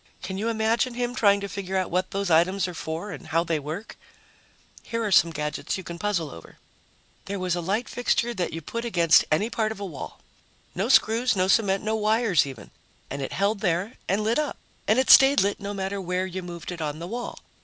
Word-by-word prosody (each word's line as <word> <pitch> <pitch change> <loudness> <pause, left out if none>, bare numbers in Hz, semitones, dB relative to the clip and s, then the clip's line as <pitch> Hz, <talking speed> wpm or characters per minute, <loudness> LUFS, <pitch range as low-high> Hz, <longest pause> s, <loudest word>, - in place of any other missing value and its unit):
Can 190 0 -4
you 220 - -1
imagine 230 +2 +1
him 245 0 -2
trying 200 -4 +3
to 200 - -3
figure 190 -1 -4
out 185 - -1
what 185 +1 0
those 195 -2 -2
items 185 +4 +3
are 180 - -6
for 165 +5 -5
and - - -9
how 165 +1 +1
they 165 -2 -1
work? 155 +9 -7 0.8
Here 230 0 -3
are 210 - -1
some 170 -2 +6
gadgets 150 +2 -3
you 190 - -7
can 170 -1 -8
puzzle 185 -8 -1
over: 85 - -13 0.7
There 200 +1 -4
was 185 -2 -1
a 175 - -2
light 200 +8 -1
fixture 240 -1 0
that 185 -5 -2
you 165 0 -6
put 230 +9 -4
against 170 -8 +4
any 180 +8 +2
part 220 -2 0
of 220 - -7
a 200 - -4
wall 165 -7 -8 0.5
no 195 +6 -2
screws, 240 -1 +4
no 185 -1 +2
cement, 195 -1 +2
no 215 +1 0
wires, 215 - +2
even 125 -7 -10 0.4
and 140 +1 -4
it 135 - -4
held 200 +2 +1
there 190 +3 -1
and 200 +3 +1
lit 225 +6 +1
up, 300 -2 -2 0.3
and 215 - +4
it 260 - +4
stayed 270 +1 +8
lit 200 +1 0
no 200 -1 -5
matter 195 0 -3
where 180 +1 -1
you 185 0 -5
moved 175 -1 -7
it 170 -2 -6
on 150 -1 -3
the 165 - -6
wall. 240 +6 -5
195 Hz, 225 wpm, -25 LUFS, 170-220 Hz, 0.8 s, stayed